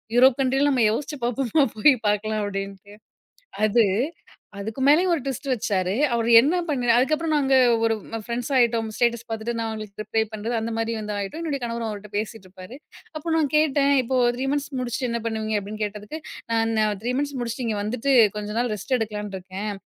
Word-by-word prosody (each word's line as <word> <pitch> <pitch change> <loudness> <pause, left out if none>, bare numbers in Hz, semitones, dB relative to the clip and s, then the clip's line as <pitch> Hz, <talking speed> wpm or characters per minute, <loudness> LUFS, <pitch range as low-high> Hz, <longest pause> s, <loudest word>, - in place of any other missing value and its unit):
Europe 255 0 +6
கண்ட்ரில 270 +2 +2
நம்ம 255 -4 +2
யோசிச்சு 295 +6 -3
பார்ப்போமா? 250 +4 +1
போய் 275 +7 +6
பார்க்கலாம் 215 +1 0
அப்படின்ட்டு, 195 0 -6 0.7
அது 225 +2 +4 0.7
அதுக்கு 220 +6 -5
மேலேயும் 345 +5 +5
ஒரு 310 - -3
ட்விஸ்ட் 275 0 -4
வச்சாரு, 195 -5 0 0.2
அவர் 230 -1 0
என்ன 290 +8 +1
பண்ணி 260 -5 -1
அதுக்கப்பறம் 310 +4 +1
நாங்க 270 -2 +2 0.3
ஒரு 225 0 +3 0.2
ம் 225 - -4
ஃப்ரெண்ட்ஸ் 240 +3 -3
ஆயிட்டோம். 235 -2 +2
ஸ்டேட்டஸ் 235 -1 +1
பார்த்துட்டு 225 +1 -3
நான் 225 -1 -2
அவுங்களுக்கு 215 -2 -6
ரிப்ளே 220 +1 0
பண்றது, 220 +3 -3
அந்த 230 +1 -3
மாதிரி 225 0 -1
வந்து 210 -1 -4
ஆயிட்டோம். 205 +12 -4
என்னுடைய 295 -4 -2
கணவரும் 230 -1 -3
அவர்கிட்ட 210 0 -9
பேசிட்டு 215 -2 -6
இருப்பாரு, 185 +6 -11 0.4
அப்போ 320 +2 -3
நான் 310 -3 +1
கேட்டேன், 285 -2 +3
"இப்போ 255 +2 0 0.2
3 260 +2 -2
மந்த்ஸ் 290 0 -2
முடிச்சுட்டு 250 0 -2
என்ன 235 0 -2
பண்ணுவீங்க?" 220 -1 -1
அப்படீன்னு 210 +2 -4
கேட்டதுக்கு, 210 +8 -6 0.3
"நா 230 - +2 0.2
நான் 210 -2 +1
3 245 +2 -1
மந்த்ஸ் 285 -1 -2
முடிச்சுட்டு, 235 +1 -3
இங்க 215 -2 -1
வந்துட்டு 245 +6 -1 0.3
கொஞ்ச 210 0 -5
நாள் 245 -2 0
ரெஸ்ட் 255 +6 -1
எடுக்கலான்னு 210 -3 -4
இருக்கேன், 190 +3 -5
230 Hz, 185 wpm, -24 LUFS, 210-270 Hz, 0.7 s, Europe